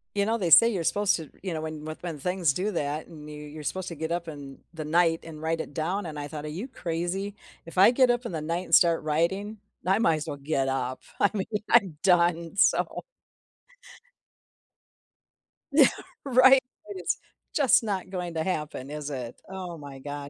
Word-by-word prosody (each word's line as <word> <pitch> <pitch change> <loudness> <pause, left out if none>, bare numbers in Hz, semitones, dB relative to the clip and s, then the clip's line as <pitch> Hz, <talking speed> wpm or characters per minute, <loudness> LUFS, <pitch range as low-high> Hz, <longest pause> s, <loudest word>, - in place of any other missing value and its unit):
You 200 0 +2
know, 225 +2 +1
they 180 -6 -1
say 230 +8 +9
you're 195 -7 -1
supposed 205 +4 +2
to, 160 -4 -9
you 185 -3 -3
know, 155 - -3
when 155 -1 -6
when 155 0 -5
when 165 -4 -5
things 180 0 +1
do 200 +6 -1
that, 150 -2 -2
and 150 -3 -11
you 150 - -8
you're 150 +1 -9
supposed 185 +4 -3
to 170 - -5
get 160 +2 -4
up 170 0 -2
in 140 -3 -9
the 160 -2 -5
night, 165 +1 +2
and 155 -2 -10
write 160 0 -1
it - - -9
down, 180 +6 -2
and 155 -3 -6
I 145 - -4
thought, 150 0 -7
"Are - - -5
you 190 - -5
crazy?" 180 -1 -3 0.3
If 165 +2 -11
I 195 +5 +8
get 255 0 +4
up 240 0 +1
in 230 - -4
the 160 - -3
night, 170 +4 -2
and - - +4
start 170 -3 +4
writing, 190 +8 -1 0.3
I 195 +3 +3
might 165 -8 +3
as 155 +2 -6
well 145 - -3
get 140 -1 -1
up. 130 -1 -2 0.2
I 205 - +5
mean, 195 -3 -2 0.3
I'm 195 -10 +4
done, 170 -2 +2
so - - +2 2.7
Yeah, - - +7 0.4
right? 260 0 +7 0.3
It 195 -3 -6
is - - 0 0.4
just 260 -4 +5
not 195 -4 -3
going 180 -2 -4
to 160 - 0
happen, 150 -6 -3
is 150 0 -5
it? 125 -4 -6
Oh, 185 -3 -6
my 140 -2 -10
god. 145 +1 -6
165 Hz, 205 wpm, -27 LUFS, 150-190 Hz, 2.7 s, say